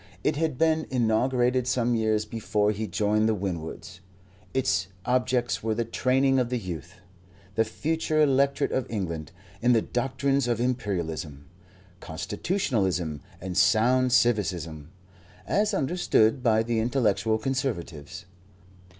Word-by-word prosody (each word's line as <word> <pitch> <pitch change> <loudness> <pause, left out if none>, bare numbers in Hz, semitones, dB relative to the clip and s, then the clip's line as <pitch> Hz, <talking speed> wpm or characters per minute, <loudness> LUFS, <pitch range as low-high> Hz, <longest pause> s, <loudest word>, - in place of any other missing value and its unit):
It 150 - +1
had 155 -3 -1
been 160 0 +2
inaugurated 125 +1 +1
some 120 -2 +1
years 110 -2 +1
before 105 -1 0
he 110 +1 -3
joined 105 +3 +1
the 110 - +2
Winwoods. 90 -1 -5 0.5
Its 130 -8 +1 0.2
objects 125 -1 +1
were 110 0 -1
the 115 +1 -1
training 130 +3 +2
of 125 -2 0
the 125 - -1
youth, 90 - -7 0.6
the 110 - +3
future 155 +7 -1
electorate 140 -1 +2
of 130 - -1
England, 85 -8 -4 0.3
in 120 +1 +4
the 115 - +4
doctrines 135 +1 0
of 120 -2 0
Imperialism, 85 - -3 0.5
Constitutionalism 95 - -2 0.2
and 95 -1 -5
sound 125 +6 +3
civicism, 90 - +1 0.6
as 210 +1 +1
understood 140 - +2
by 110 -2 +3
the 115 0 -1
intellectual 110 -3 +1
Conservatives. 100 - -4
115 Hz, 125 wpm, -26 LUFS, 100-130 Hz, 0.6 s, in